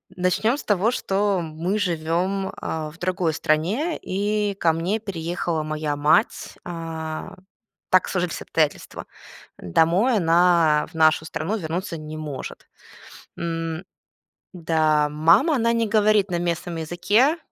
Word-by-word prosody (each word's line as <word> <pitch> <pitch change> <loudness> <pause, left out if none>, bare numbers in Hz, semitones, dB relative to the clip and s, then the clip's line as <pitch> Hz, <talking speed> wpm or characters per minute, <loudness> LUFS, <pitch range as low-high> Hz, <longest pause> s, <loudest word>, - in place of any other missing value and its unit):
начнем 185 +8 +1
с - - -7
того, 205 +3 +2
что, 195 -4 0
мы 165 +6 -2
живем, 180 +2 -1
а, 155 -1 -4
в 165 - -18
другой 180 -2 0
стране, 185 - 0
и 205 +1 -1
ко 170 -4 +2
мне 175 +7 -1
переехала 170 -5 -3
моя 155 -1 -2
мать. 150 +2 +1
А, 165 -2 -6 0.5
так 185 - +4
сложились 180 -3 -2
обстоятельства. 155 -3 -2 0.5
Домой 170 - +2
она, 170 -3 +4
в - - -18
нашу 160 0 +3
страну, 175 +7 -3
вернуться 170 0 -4
не 155 0 -8
может. 150 -4 -7 0.7
М 165 0 -3 0.7
Да, 155 -3 +1
мама, 165 - +4
она 230 -2 +2
не 230 -1 +1
говорит 210 -2 +3
на 175 - 0
местном 170 0 -2
языке, 205 - +2
170 Hz, 125 wpm, -23 LUFS, 160-200 Hz, 0.7 s, так